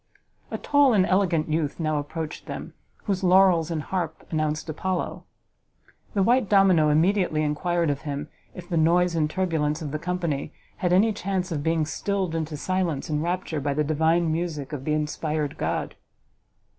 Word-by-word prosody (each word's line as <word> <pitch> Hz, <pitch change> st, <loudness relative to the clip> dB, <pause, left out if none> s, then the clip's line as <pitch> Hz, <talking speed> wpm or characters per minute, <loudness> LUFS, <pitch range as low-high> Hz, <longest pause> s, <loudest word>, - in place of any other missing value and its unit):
A -, -, -3 dB
tall 285 Hz, -3 st, +4 dB
and 185 Hz, -2 st, +4 dB
elegant 185 Hz, -5 st, +2 dB
youth 155 Hz, -1 st, -1 dB
now 155 Hz, -2 st, 0 dB
approached 155 Hz, +2 st, -6 dB
them, -, -, -6 dB, 0.3 s
whose 195 Hz, -2 st, -2 dB
laurels 180 Hz, -3 st, +5 dB
and 160 Hz, -3 st, -2 dB
harp 170 Hz, -3 st, -3 dB
announced 155 Hz, -1 st, -1 dB
Apollo. 180 Hz, +3 st, -3 dB, 0.9 s
The 195 Hz, -, +3 dB
white 240 Hz, +1 st, +3 dB
domino 190 Hz, -6 st, +5 dB
immediately 160 Hz, 0 st, +2 dB
enquired 165 Hz, +2 st, 0 dB
of 140 Hz, -, -4 dB
him 145 Hz, 0 st, -4 dB, 0.3 s
if 180 Hz, -2 st, -9 dB
the 170 Hz, -, -1 dB
noise 170 Hz, +2 st, +3 dB
and 155 Hz, -2 st, +1 dB
turbulence 160 Hz, -4 st, 0 dB
of 155 Hz, -4 st, -5 dB
the 155 Hz, -, -3 dB
company 170 Hz, -4 st, -2 dB, 0.2 s
had 180 Hz, -, 0 dB
any 210 Hz, +5 st, +4 dB
chance 190 Hz, -2 st, -2 dB
of 150 Hz, -3 st, -1 dB
being 160 Hz, 0 st, +1 dB
stilled 190 Hz, +2 st, -2 dB
into 160 Hz, -2 st, -3 dB
silence 175 Hz, -4 st, -1 dB
and 150 Hz, 0 st, 0 dB
rapture 170 Hz, -2 st, -2 dB
by 140 Hz, 0 st, -1 dB
the 150 Hz, -, +2 dB
divine 160 Hz, +2 st, +2 dB
music 155 Hz, -3 st, -3 dB
of 135 Hz, -2 st, -5 dB
the 150 Hz, -, +1 dB
inspired 150 Hz, -1 st, -2 dB
god? -, -, -2 dB
165 Hz, 170 wpm, -25 LUFS, 150-185 Hz, 0.9 s, laurels